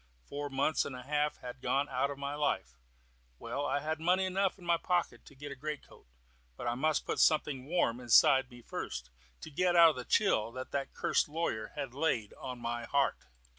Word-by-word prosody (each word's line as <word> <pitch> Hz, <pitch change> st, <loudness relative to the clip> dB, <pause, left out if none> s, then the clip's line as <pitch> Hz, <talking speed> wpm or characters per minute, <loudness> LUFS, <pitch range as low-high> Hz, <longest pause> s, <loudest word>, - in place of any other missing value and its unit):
Four 145 Hz, 0 st, -5 dB
months 140 Hz, +3 st, +1 dB
and 135 Hz, -, -6 dB
a 125 Hz, -, -8 dB
half 150 Hz, +2 st, 0 dB
had 125 Hz, +1 st, -8 dB
gone 140 Hz, +2 st, +1 dB
out 135 Hz, +1 st, 0 dB
of 140 Hz, -, -5 dB
my 140 Hz, +1 st, -4 dB
life. 145 Hz, -, -1 dB, 0.6 s
Well, 145 Hz, -, -3 dB
I 145 Hz, +1 st, 0 dB
had 155 Hz, +1 st, -2 dB
money 180 Hz, +3 st, +2 dB
enough 190 Hz, +1 st, 0 dB
in 180 Hz, -, -14 dB
my 170 Hz, 0 st, +3 dB
pocket 175 Hz, 0 st, -1 dB
to 140 Hz, -, -15 dB
get 145 Hz, +1 st, -8 dB
a -, -, -6 dB
greatcoat; 150 Hz, -, -7 dB, 0.5 s
but -, -, -6 dB
I 120 Hz, -, +1 dB
must 150 Hz, +4 st, 0 dB
put -, -, -2 dB
something 140 Hz, -4 st, +2 dB
warm 155 Hz, -8 st, +1 dB
inside 130 Hz, +2 st, +5 dB
me 120 Hz, -1 st, -14 dB
first, 60 Hz, -, -5 dB, 0.3 s
to 160 Hz, -, -8 dB
get 175 Hz, +4 st, +1 dB
out 165 Hz, -2 st, +8 dB
the 125 Hz, -, -5 dB
chill 120 Hz, -, +2 dB
that 135 Hz, +2 st, -4 dB
cursed -, -, +1 dB
lawyer 150 Hz, -9 st, -2 dB
had 140 Hz, -4 st, -4 dB
laid 130 Hz, -7 st, 0 dB
on 125 Hz, -1 st, -6 dB
my 120 Hz, 0 st, -3 dB
heart. 140 Hz, +3 st, 0 dB
140 Hz, 200 wpm, -32 LUFS, 125-155 Hz, 0.6 s, out